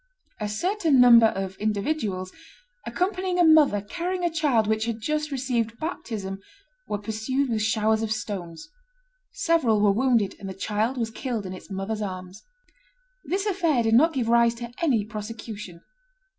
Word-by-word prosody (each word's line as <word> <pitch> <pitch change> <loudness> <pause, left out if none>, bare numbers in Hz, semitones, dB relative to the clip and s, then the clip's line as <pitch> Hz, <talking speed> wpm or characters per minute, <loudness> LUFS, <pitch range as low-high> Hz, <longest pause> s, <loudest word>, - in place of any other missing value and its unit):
A 210 -1 -3
certain 330 - +1
number 235 -2 +8
of 190 -2 -4
individuals, 205 -3 -2 0.6
accompanying 370 -1 -1
a 355 - +5
mother 310 -10 +5
carrying 355 - -4
a 345 - +1
child 290 -9 +2
which 220 +1 0
had 230 -1 -3
just 305 +6 -2
received 245 -4 -2
baptism, 210 - -5 0.5
were 210 - -2
pursued 220 +6 -2
with 220 -1 0
showers 220 0 +1
of 220 -1 -2
stones; 190 - -5 0.6
several 270 -11 +2
were 205 -1 +4
wounded, 230 -2 +2
and 195 -2 -7
the 190 - -7
child 215 +6 -1
was 230 -2 -2
killed 230 -3 -4
in 185 - -5
its 185 - -11
mother's 195 +3 -3
arms." 185 -1 -6 0.8
This 390 +3 -1
affair 340 - +1
did 225 0 +1
not 320 +8 +5
give 250 -5 -1
rise 235 0 +4
to 235 0 -7
any 250 -11 +2
prosecution. 215 -4 -8
225 Hz, 155 wpm, -25 LUFS, 210-280 Hz, 0.8 s, number